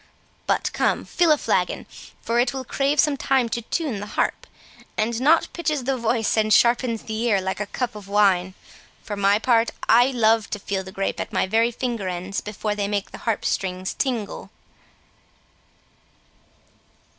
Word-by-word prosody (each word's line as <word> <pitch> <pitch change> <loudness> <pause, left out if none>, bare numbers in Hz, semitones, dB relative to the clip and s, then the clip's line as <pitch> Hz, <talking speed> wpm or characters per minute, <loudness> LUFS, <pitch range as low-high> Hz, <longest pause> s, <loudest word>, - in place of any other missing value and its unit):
But - - 0
come, - - 0
fill 345 -2 +2
a 305 - +5
flagon, - - -1 0.4
for 235 +1 +1
it 245 +2 +1
will 265 - -3
crave 280 +4 0
some 295 -1 +3
time 265 -3 +1
to 235 - -2
tune 260 - -2
the 205 - -6
harp; - - -2 0.5
and 230 +2 0
nought 315 +5 +4
pitches 305 -5 -1
the 270 +2 0
voice 230 -2 0
and 215 0 +2
sharpens 235 0 +3
the 220 - -6
ear 230 -4 +2
like 190 +1 -3
a 210 - -3
cup 245 +2 -3
of 210 -2 -10
wine. 190 -2 +2 0.5
For 210 - -5
my 200 0 +3
part, 230 0 +2 0.2
I 240 +2 +6
love 225 -4 +2
to - - -3
feel 195 -1 -3
the 190 - -10
grape 195 0 -3
at - - -4
my 190 - +1
very 225 +4 +2
finger 235 -4 -3
ends 185 +2 -4
before 210 0 -3
they 205 -1 -2
make 205 -1 -2
the - - -9
harp 220 - -1
strings 185 -1 -2
tinkle." 240 -7 -3
225 Hz, 175 wpm, -23 LUFS, 200-250 Hz, 0.5 s, I